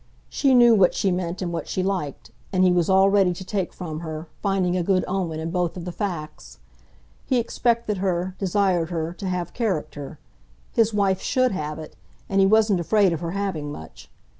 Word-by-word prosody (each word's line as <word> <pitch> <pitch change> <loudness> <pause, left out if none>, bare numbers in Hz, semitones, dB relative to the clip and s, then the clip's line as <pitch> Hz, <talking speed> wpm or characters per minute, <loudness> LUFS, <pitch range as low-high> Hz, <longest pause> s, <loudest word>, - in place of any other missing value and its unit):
She 270 -3 +2
knew 240 -1 +7
what 195 -5 +4
she 195 - +1
meant 180 0 -2
and 175 -1 -3
what 165 - -4
she 185 - -1
liked, 180 -11 -3 0.2
and 185 -1 +2
he 185 - +5
was 175 -1 +2
all 190 +1 +5
ready 195 -3 +3
to 185 - -8
take 190 -2 -2
from 160 -4 -6
her, 160 0 -6
finding 190 -3 +1
a 180 - +1
good 185 +1 +1
omen 180 -4 -2
in 160 +1 -4
both 180 -1 -1
of 175 - -6
the 180 - -4
facts. 155 - -5 0.7
He 255 - +2
expected 235 -2 0
her, 185 -1 -1
desired 185 -3 +1
her, 165 -1 -3
to 190 +2 -6
have 180 -2 -3
character; 160 - -3 0.6
his 225 -1 +3
wife 200 -3 +1
SHOULD 255 -1 +1
have 155 -5 -4
it, 155 -1 -9 0.3
and 195 -1 +1
he 195 - +5
wasn't 215 -2 +4
afraid 195 +1 +3
of 165 - -3
her 170 +1 -4
having 170 -8 -3
much. 80 - -11
185 Hz, 200 wpm, -24 LUFS, 170-200 Hz, 0.7 s, knew